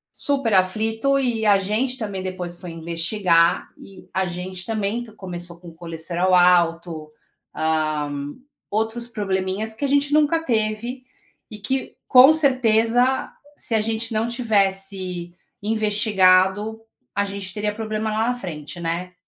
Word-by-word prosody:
Super 275 Hz, -6 st, +1 dB
aflito, 220 Hz, +8 st, +2 dB
e 240 Hz, -4 st, 0 dB
a 205 Hz, -2 st, +5 dB
gente, 220 Hz, +7 st, -1 dB
também, 205 Hz, -6 st, -4 dB
depois 185 Hz, -2 st, -5 dB
foi 180 Hz, -, -7 dB
investigar, 170 Hz, +1 st, +1 dB
e 195 Hz, -1 st, -15 dB
a 190 Hz, +1 st, 0 dB
gente 180 Hz, +1 st, -6 dB
também 220 Hz, +2 st, -2 dB
t 230 Hz, -, -13 dB
começou 175 Hz, -4 st, -7 dB
com 175 Hz, -, -11 dB
o 165 Hz, -, -14 dB
colesterol 170 Hz, +2 st, -1 dB
alto, 170 Hz, -3 st, +2 dB, 0.4 s
ah, 155 Hz, -2 st, -1 dB, 0.6 s
outros 225 Hz, +3 st, -2 dB
probleminhas 200 Hz, 0 st, -1 dB
que 220 Hz, -, -7 dB
a 280 Hz, -, +2 dB
gente 285 Hz, +1 st, +1 dB
nunca 310 Hz, +2 st, +2 dB
teve 230 Hz, +2 st, -1 dB, 0.5 s
e 215 Hz, -, -9 dB
que, 260 Hz, +6 st, -3 dB
com 260 Hz, +3 st, +8 dB
certeza, 250 Hz, -3 st, +2 dB, 0.2 s
se 235 Hz, -, -2 dB
a 220 Hz, -, +4 dB
gente 225 Hz, +1 st, -2 dB
não 220 Hz, +2 st, 0 dB
tivesse 195 Hz, -6 st, 0 dB, 0.3 s
investigado, 210 Hz, -1 st, +2 dB, 0.4 s
a 200 Hz, 0 st, +1 dB
gente 195 Hz, -1 st, -5 dB
teria 210 Hz, 0 st, -2 dB
problema 215 Hz, 0 st, -3 dB
lá 220 Hz, +2 st, 0 dB
na -, -, +1 dB
frente, 170 Hz, -6 st, -7 dB
né. 170 Hz, +2 st, -3 dB
205 Hz, 140 wpm, -22 LUFS, 180-225 Hz, 0.6 s, com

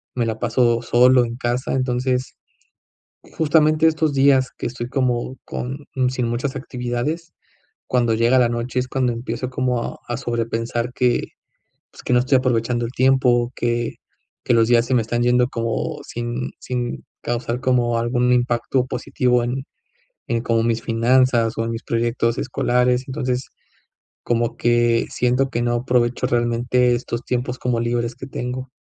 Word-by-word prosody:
me 120 Hz, -, 0 dB
la 110 Hz, -1 st, -2 dB
paso 120 Hz, 0 st, +2 dB
solo 125 Hz, +1 st, +5 dB
en 115 Hz, 0 st, -5 dB
casa. 120 Hz, +1 st, -2 dB
Entonces, 130 Hz, 0 st, -1 dB, 1.0 s
justamente 155 Hz, 0 st, +3 dB
estos 155 Hz, -2 st, 0 dB
días 135 Hz, -1 st, +4 dB
que -, -, -4 dB
estoy 120 Hz, 0 st, -5 dB
como 130 Hz, -1 st, -1 dB
con 135 Hz, +4 st, -6 dB, 0.2 s
sin 125 Hz, -2 st, -1 dB
muchas 125 Hz, +3 st, -2 dB
actividades, 130 Hz, +6 st, -4 dB, 0.5 s
cuando 120 Hz, -3 st, +1 dB
llega 120 Hz, +3 st, +3 dB
la 120 Hz, -2 st, +3 dB
noche 120 Hz, +2 st, -2 dB
es 125 Hz, -, -2 dB
cuando 130 Hz, -2 st, 0 dB
empiezo 125 Hz, +2 st, -4 dB
como 125 Hz, -1 st, 0 dB
a -, -, -6 dB
a 120 Hz, -, -2 dB
sobrepensar 115 Hz, -1 st, -2 dB
que, 125 Hz, -2 st, +1 dB, 0.6 s
pues, -, -, -14 dB
que -, -, -1 dB
no 125 Hz, -, +5 dB
estoy 130 Hz, +2 st, +3 dB
aprovechando 120 Hz, -1 st, 0 dB
el 115 Hz, -, -8 dB
tiempo, 125 Hz, -2 st, +3 dB
que 120 Hz, 0 st, -1 dB, 0.5 s
que -, -, +2 dB
los 115 Hz, 0 st, +4 dB
días 120 Hz, -1 st, +4 dB
se 130 Hz, -, 0 dB
me 120 Hz, -, +3 dB
están 120 Hz, +2 st, -1 dB
yendo 125 Hz, 0 st, +3 dB
como 115 Hz, -2 st, -2 dB
sin 120 Hz, +1 st, -4 dB
sin 125 Hz, -1 st, -4 dB, 0.2 s
causar 120 Hz, 0 st, -2 dB
como 125 Hz, -2 st, +1 dB
algún 120 Hz, +1 st, +1 dB
impacto 125 Hz, +1 st, +1 dB
positivo 125 Hz, -1 st, 0 dB
en 130 Hz, +3 st, -3 dB, 0.6 s
en 115 Hz, -1 st, 0 dB
como 115 Hz, -2 st, +1 dB
mis 115 Hz, -1 st, 0 dB
finanzas, 120 Hz, 0 st, +2 dB
o 115 Hz, -, 0 dB
en 115 Hz, -, -2 dB
mis 115 Hz, -, -5 dB
proyectos 115 Hz, 0 st, 0 dB
escolares. 125 Hz, -1 st, +1 dB
Entonces, 130 Hz, -2 st, -2 dB, 0.7 s
como 120 Hz, 0 st, 0 dB
que 120 Hz, -1 st, +2 dB
siento 125 Hz, +2 st, +1 dB
que 120 Hz, -2 st, -2 dB
no 120 Hz, 0 st, +1 dB
aprovecho 120 Hz, 0 st, +1 dB
realmente, 120 Hz, +1 st, +2 dB
estos 120 Hz, 0 st, -4 dB
tiempos 125 Hz, 0 st, -2 dB
como 125 Hz, -2 st, 0 dB
libres 120 Hz, 0 st, -1 dB
que 130 Hz, -, -8 dB
tengo. 130 Hz, 0 st, -5 dB
120 Hz, 160 wpm, -21 LUFS, 120-130 Hz, 1.0 s, solo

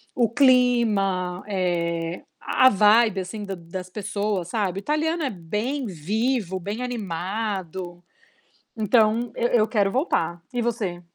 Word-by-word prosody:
o 235 Hz, -3 st, +2 dB
clima, 225 Hz, -9 st, +2 dB
eh, 170 Hz, -3 st, -1 dB, 0.2 s
a 260 Hz, 0 st, +4 dB
vibe 210 Hz, 0 st, +4 dB
assim 205 Hz, +3 st, -6 dB
da 195 Hz, -1 st, -4 dB
das 180 Hz, +2 st, -8 dB
pessoas, 200 Hz, -2 st, -2 dB
sabe. 195 Hz, -3 st, -1 dB
O -, -, -8 dB
italiano 315 Hz, -, 0 dB
é 270 Hz, -, 0 dB
bem 210 Hz, -, -3 dB
vivo, 200 Hz, -, -1 dB
bem 205 Hz, +7 st, -5 dB
animado, 190 Hz, -4 st, -4 dB, 0.7 s
então 220 Hz, +2 st, +2 dB
eu 240 Hz, -, +1 dB
eu 220 Hz, -2 st, +3 dB
quero 200 Hz, -4 st, +1 dB
voltar. 175 Hz, -, 0 dB
E 245 Hz, -, 0 dB
você? 215 Hz, -7 st, -2 dB
205 Hz, 130 wpm, -24 LUFS, 180-235 Hz, 0.7 s, a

